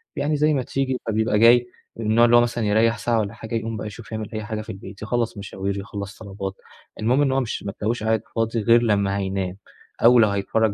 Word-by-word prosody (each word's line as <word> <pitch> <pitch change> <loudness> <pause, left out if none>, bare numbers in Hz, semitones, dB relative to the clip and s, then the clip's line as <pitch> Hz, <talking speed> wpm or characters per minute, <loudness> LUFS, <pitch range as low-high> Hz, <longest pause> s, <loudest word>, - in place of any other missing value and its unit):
يعني 150 +2 0
زي 150 +1 +3
ما 135 -3 0
تيجي، 130 0 -1
فبيبقى 110 -1 +1
جاي 120 +2 +6 0.3
من 115 - -5
النوع 110 +2 +5
اللي 120 0 +5
هو 120 - +7
مثلًا 120 -1 -1
يريَّح 110 +2 +3
ساعة 115 0 0
والّا 105 0 -2
حاجة 110 +1 -6
يقوم 115 0 -3
بقى 105 - -5
يشوف 105 +1 -10
يعمل 110 -1 -4
أي 110 0 -3
حاجة 110 0 -4
في 110 - -8
البيت 95 +1 -10
يخلص 115 0 -1
مشاوير 100 0 -4
يخلص 100 0 -7
طلبات، 100 -2 -6 0.5
المهم 125 +6 +2
إن 140 -2 +2
هو 135 - +2
مش 125 -4 -3
ما 100 - -4
تلاقيهوش 110 +2 -3
قاعد 110 0 +1
فاضي 115 0 0
غير 115 +2 +5
لما 100 -3 +1
هينام 95 -1 -3 0.5
أو 120 +1 +7
لو 110 -2 +5
هيتفرج 100 +2 0
110 Hz, 230 wpm, -23 LUFS, 100-120 Hz, 0.5 s, هو